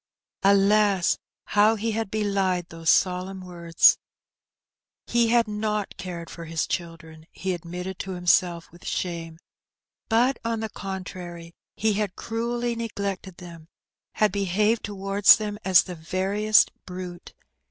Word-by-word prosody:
Alas! 200 -1 +3 0.3
how 210 +2 +5
he 225 +1 -2
had 220 -1 -2
belied 195 -4 0
those 165 -1 -3
solemn 185 +1 +2
words! 170 -2 +3 1.1
He 235 -1 +2
had 235 0 +3
not 210 -1 -2
cared 175 -2 -7
for 170 - -9
his 160 0 -1
children, 165 -2 -6
he 190 0 -3
admitted 180 +2 -6
to 190 - -4
himself 175 -1 +1
with 175 - -17
shame; 165 -2 -4 0.7
but, 240 +4 +2
on 230 -1 -1
the 220 0 -3
contrary, 180 -4 -7 0.2
he 220 0 +1
had 205 -2 -2
cruelly 235 +1 -2
neglected 200 -5 -4
them, 170 -3 -11 0.5
had 215 -2 +2
behaved 205 +3 +1
towards 195 0 +4
them 210 -1 -5
as 185 -2 +6
the 180 - -7
veriest 195 +6 +2 0.2
brute. 180 -1 -8
190 Hz, 130 wpm, -25 LUFS, 175-210 Hz, 1.1 s, as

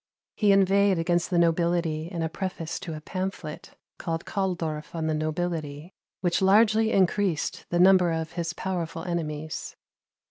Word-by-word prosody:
He 210 -2 +3
inveighed 195 0 +4
against 175 +1 +1
the 180 - +1
nobility 170 -1 +1
in 170 -3 -3
a - - +1
preface 170 -1 -4
to 175 -4 -6
a 155 - -8
pamphlet, 185 -3 -5 0.2
called 165 -1 -3
Kahldorf 170 -6 -3
on 160 -1 -2
the 160 - 0
Nobility, 155 0 -3 0.3
which 175 -1 +1
largely 220 +3 +4
increased 190 -3 +1
the 175 - 0
number 185 -1 +6
of 160 0 -3
his 170 -1 -3
powerful 170 -3 -4
enemies. 155 -3 -4
170 Hz, 145 wpm, -26 LUFS, 160-190 Hz, 0.3 s, number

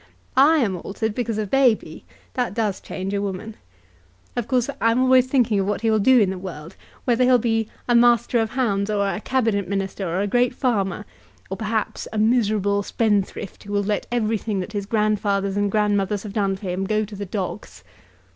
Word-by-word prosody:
I 295 +5 +6
am 210 -10 +1
altered 210 +5 -3
because 230 -2 -2
of 210 -3 -3
Baby. 260 -5 +2 0.3
That 245 -7 -2
does 215 -4 -1
change 190 +1 -5
a 200 - 0
woman. 200 +2 -5 0.8
Of 240 -2 -2
course 250 -2 +1
I'm 230 +3 +3 0.2
thinking 245 -5 +1
always - - +2
of 190 - -2
what 205 - -2
he 225 -1 +2
will 220 - +3
do 255 +5 +5
in 200 -4 +3
the 190 - -5
world; 170 -2 -8 0.3
whether 245 0 +2
he'll 250 0 +5
be 225 -2 0 0.2
a 240 - +2
master 235 0 +4
of 225 -1 0
hounds 210 -6 0
or 200 -1 +1
a 200 +2 -3
Cabinet 225 -7 0
Minister 195 0 -3
or 180 +3 -1
a - - +1
great 245 +4 +1
farmer; 210 -7 -1 0.5
or 190 - -3
perhaps 220 +1 -2
a 220 - -4
miserable 210 -3 +2
spendthrift, 205 -2 -1
who 205 - -6
will 205 0 +1
let 205 0 -2
everything 220 -3 -1
that 185 +4 -5
his 200 -1 -3
grandfathers 205 -2 0
and 205 0 +1
grandmothers 205 -1 +1
have 205 -2 -7
done 195 -2 0
for 190 - -14
him 185 +2 -2
go 215 +2 0
to 210 0 -10
the 200 0 -6
dogs." 190 -1 -5
210 Hz, 200 wpm, -22 LUFS, 200-230 Hz, 0.8 s, I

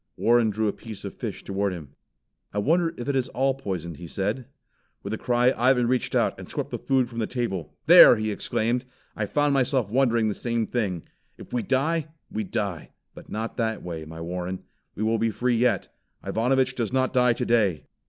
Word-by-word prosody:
Warren 120 -1 +4
drew 110 +1 0
a 105 - 0
piece 110 -3 -9
of - - -5
fish - - -6
toward 100 0 -1
him. 80 -6 -8 0.6
"I - - -6
wonder 165 +10 +2
if 120 - -6
it 140 - 0
is 130 -2 +1
all 135 +2 +1
poisoned," 90 - -5
he 85 - -8
said. 105 +8 -2 0.6
With 100 - -4
a - - -2
cry 125 +1 +3
Ivan 125 0 +3
reached 125 0 0
out - - +1
and - - -9
swept - - -4
the - - -3
food 130 -2 +1
from 120 -1 -7
the 110 - 0
table. 95 - -3
"There!" - - +10
he 110 -1 -2
exclaimed, 120 +4 -1 0.3
"I 105 - -2
found 145 +5 +2
myself 130 -5 +1
wondering 120 -3 +3
the 105 - 0
same 115 +1 -1
thing. 100 -9 -2 0.3
If - - -12
we 120 - +1
die, 150 +6 0 0.2
we 110 - -2
die 100 -5 -4 0.2
but - - -13
not 110 +2 -4
that 110 -2 -1
way, 85 -3 -5
my 80 +1 -9
Warren. 90 +2 -4 0.3
We 105 - -3
will 110 +1 +1
be 115 - +2
free 120 +2 0
yet. 125 +1 +1 0.3
Ivanovich 130 +3 +1
does 115 -4 -2
not 130 0 +1
die 125 -1 +4
today." 105 - +1
115 Hz, 200 wpm, -25 LUFS, 100-125 Hz, 0.6 s, There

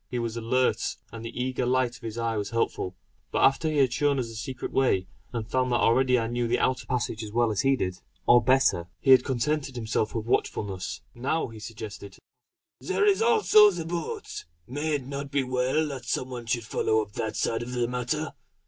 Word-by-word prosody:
He 125 - -3
was 115 -1 -2
alert, 120 +2 +1 0.2
and 115 -1 -8
the 115 +1 -6
eager 130 0 -1
light 125 0 +1
of - - -23
his 115 -1 -6
eye 115 -1 -1
was 100 -1 -2
helpful; 100 -5 -1 0.4
but - - +1
after 135 +4 +4
he 155 - -1
had 130 -3 +3
shown 145 +1 +2
us 125 -3 -2
the - - -9
secret 120 +3 -5
way, 125 -9 +2 0.3
and 115 -3 -4
found 130 +1 0
that - - +3
already 125 +2 +4
I 115 - 0
knew 120 +1 -1
the 120 +1 +2
outer 130 -2 0
passage 120 -3 -2
as 105 - -7
well 120 0 +2
as 100 - 0
he 135 0 +3
did, 90 -7 -3 0.3
or 120 0 +6
better, 130 -9 +3
he 135 - +3
had 130 -1 +8
contented 135 +1 -1
himself 110 -2 -1
with 110 -1 -2
watchfulness. 100 -5 -2
Now 135 +5 -1
he 110 -1 -10
suggested: 105 -2 -8 0.6
"There 415 - 0
is 405 +1 +4
also 430 - +6
the 175 -4 -4
boat! 170 -1 -5 0.2
May 145 +6 -2
it 135 -3 -4
not 140 +1 -5
be 140 -1 +1
well 130 +5 +1
that 130 -3 -6
some 130 +2 -2
one 120 -2 -6
should 115 -1 -1
follow 110 0 +1
up 105 - -14
that 110 - -3
side 115 - 0
of 120 +1 -6
the 120 -1 0
matter? 125 +6 -2
125 Hz, 215 wpm, -27 LUFS, 115-135 Hz, 0.6 s, had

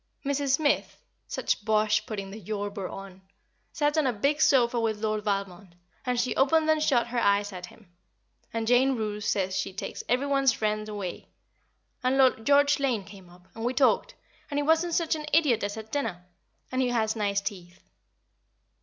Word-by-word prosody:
Mrs. 280 -1 +1
Smith 295 -1 0 0.3
(such - - -2
bosh 215 0 +2
putting 200 -4 -5
"de 215 - -8
Yorburgh" 200 -1 -4
on!) 195 -1 -10 0.5
sat 295 0 0
on 295 - +2
a - - +2
big 280 +8 0
sofa 245 -4 +4
with 225 -2 0
Lord 215 -1 -1
Valmond, 195 -3 -3 0.3
and 250 -1 +1
she 250 - 0
opened 310 +4 +3
and 310 -1 +1
shut 255 -6 +3
her 240 0 -1
eyes 205 -2 +2
at 180 -1 -7
him, 215 +2 -18 0.6
and 225 -1 -2
Jane 255 +3 +3
Roose 210 -2 -3
says 190 -1 0
she - - -2
takes 190 - -6
every 250 +4 +2
one's 275 -3 +3
friend 215 -1 -2
away; 200 -4 -6 0.7
and 255 +1 +2
Lord 255 -4 +3
George 285 0 +4
Lane 250 -7 0
came 190 -2 -14
up, 180 +1 -19
and 225 - -7
we 245 +2 -1
talked, 285 - +2 0.3
and 285 - -3
he 290 - +1
wasn't 325 +2 +2
such 335 -2 +1
an 305 -1 -6
idiot 295 -9 +3
as 205 +1 -3
at 220 0 -9
dinner, 220 -11 -3 0.5
and 255 0 0
he 250 - +1
has 220 -2 0
nice 200 -2 0
teeth. 185 -3 -7
225 Hz, 185 wpm, -27 LUFS, 205-270 Hz, 0.7 s, sofa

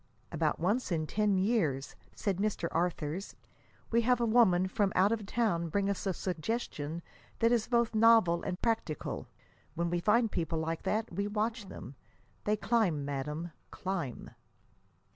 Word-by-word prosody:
"About - - 0
once 205 +7 0
in 160 -2 0
ten 205 +3 +1
years," 185 - 0 0.2
said 200 -4 -1
Mr. 200 -4 -1
Arthurs, 170 +1 -2 0.6
"we 235 +1 +4
have 245 +1 +3
a 235 - +2
woman 215 -6 +4
from 200 0 +1
out 195 +3 +4
of 215 -3 -2
town 190 -8 0
bring 200 +3 +1
us 200 - -3
a 190 - +1
suggestion 170 -3 -3 0.3
that 230 0 +3
is 235 -3 +2
both 235 -2 +2
novel 220 -6 +5
and 180 - -4
practical. 225 - -2 0.5
When 170 +1 -1
we 175 - +1
find 220 +4 +3
people 165 -2 -1
like 160 +1 -2
that, 220 -2 -1
we 200 +3 -1
watch 215 +1 -2
them. 140 - -9 0.5
They 210 +1 +2
climb, 205 -10 +1
madame, 150 +4 -4 0.2
climb." 180 -9 -4
195 Hz, 155 wpm, -31 LUFS, 170-225 Hz, 0.6 s, novel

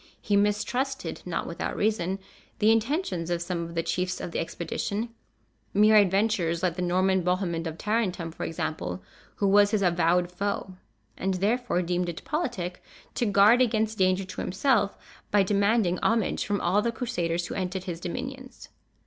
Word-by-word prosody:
He 205 - 0
mistrusted, 225 +7 0
not - - -2
without - - -4
reason, 200 -3 0 0.4
the 215 +1 +4
intentions 225 - 0
of 175 -1 0
some 170 0 -3
of 170 0 -6
the 165 - 0
chiefs 180 +2 -1
of - - -5
the - - -2
expedition, 200 +6 -3 0.7
mere 215 +2 +6
adventurers, 195 -4 +3
like 175 -2 +1
the 180 - -3
Norman 185 +1 +2
Bohemond 175 -2 -1
of 160 0 -6
Tarentum 195 -6 -1
for - - -7
example, 90 - -3 0.3
who 200 - +1
was 205 +1 +6
his 205 -1 +1
avowed 175 0 +2
foe, 195 0 -3 0.5
and 190 0 0
therefore 210 0 0
deemed 175 0 -1
it 165 - -7
politic 240 - -3 0.3
to 240 - 0
guard 205 +5 +6
against 220 -3 +1
danger 185 0 +2
to 185 - -6
himself 205 +1 +1 0.3
by 205 -1 +4
demanding 200 -1 +2
homage 225 -1 +1
from 205 -1 0
all 185 +4 +2
the 235 - 0
Crusaders 175 -9 -2
who - - -5
entered 185 0 -3
his 175 -3 -5
dominions. 260 +9 -6
195 Hz, 165 wpm, -27 LUFS, 175-215 Hz, 0.7 s, mere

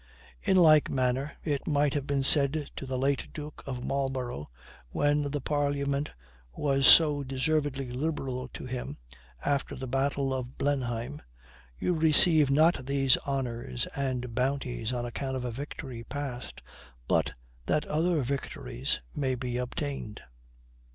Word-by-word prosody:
In 190 - +3
like 155 -4 +6
manner 130 +2 0
it 145 -3 -2
might 145 -2 +2
have 145 -1 -2
been 140 -1 0
said 145 +1 +5
to 135 - -6
the 130 0 -2
late 135 +1 0
duke 150 -1 -8
of 125 -2 -4
Marlborough, 130 - -2 0.4
when 145 - +1
the 145 +1 -2
parliament 140 0 0 0.4
was 135 -2 +2
so 150 -3 +7
deservedly 135 -1 -1
liberal 130 -2 -3
to - - -9
him, 125 - -5 0.5
after 140 -1 0
the 130 - -6
battle 135 +1 0
of 130 -1 -5
Blenheim, 130 -1 -2 0.6
"You 180 - 0
receive 160 -1 +5
not 145 -2 +3
these 135 -2 +4
honors 120 - -2
and 125 -3 -2
bounties 125 -2 -1
on 120 -1 -2
account 130 +2 -4
of 125 - -4
a 120 - -2
victory 130 -1 -7
past, 125 - -6 0.4
but - - +1 0.3
that 150 - +1
other 160 -1 +1
victories 120 - -3
may 130 -3 0
be 125 0 -3
obtained." 125 -3 -4
135 Hz, 140 wpm, -29 LUFS, 125-145 Hz, 0.6 s, so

